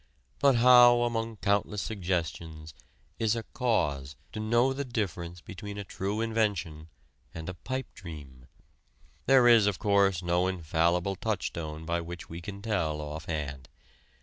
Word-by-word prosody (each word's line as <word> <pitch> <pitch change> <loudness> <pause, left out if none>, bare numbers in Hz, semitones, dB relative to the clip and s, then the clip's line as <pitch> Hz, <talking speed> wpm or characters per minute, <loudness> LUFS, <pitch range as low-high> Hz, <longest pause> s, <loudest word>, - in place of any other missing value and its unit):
But 140 -2 +5
how 120 0 +7
among 115 -1 -2
countless 100 0 0
suggestions 85 -5 -3 0.5
is 110 0 +2
a 115 - -3
"cause" 75 - 0 0.2
to - - -6
know 120 +4 +2
the 140 +1 -3
difference 90 - -4
between 100 +2 -8
a 100 - -4
true 100 +2 -3
invention 100 -9 -1 0.5
and 80 -1 -6
a 90 - -4
pipe 130 +9 -4
dream? 70 -7 -11 0.8
There 130 -2 +6
is, 115 -4 +6
of 100 - 0
course, 100 -4 +2
no 90 +1 +1
infallible 85 +1 0
touchstone 85 -7 -3
by 85 +1 -1
which 85 0 -8
we 85 +1 -7
can 100 +3 -8
tell 85 -9 -1
offhand. 75 -3 -5
95 Hz, 140 wpm, -29 LUFS, 80-110 Hz, 0.8 s, how